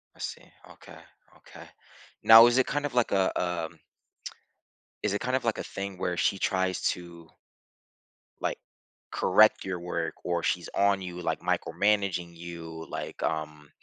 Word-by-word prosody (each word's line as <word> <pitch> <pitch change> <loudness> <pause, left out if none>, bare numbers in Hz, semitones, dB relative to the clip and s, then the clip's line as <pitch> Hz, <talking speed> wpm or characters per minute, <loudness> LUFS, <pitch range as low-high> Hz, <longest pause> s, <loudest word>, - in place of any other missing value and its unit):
I - - -22
see. - - -7 0.2
Okay, - - -14 0.4
okay. - - -14 0.6
Now 115 +1 +10
is 120 +1 +2
it 130 - +4
kind 145 +1 -2
of 145 - -4
like 120 -2 +1
a, 95 -1 +2
um 85 -2 -3 1.2
Is 105 - +1
it 105 - -1
kind 125 +1 -1
of 130 - -1
like 115 - 0
a - - -4
thing 100 -1 -6
where 90 0 -2
she 100 - +1
tries 95 -1 0
to 85 -2 -10 1.1
like, - - -1 0.5
correct - - +4
your 95 -2 -3
work 90 +1 -3
or 85 -1 -1
she's 90 - -1
on 100 -1 +3
you, 90 -1 -6
like, - - -2
micromanaging 100 -4 0
you? 85 -1 -8
Like, - - -6
um 75 -2 -3
90 Hz, 155 wpm, -28 LUFS, 85-100 Hz, 1.2 s, Now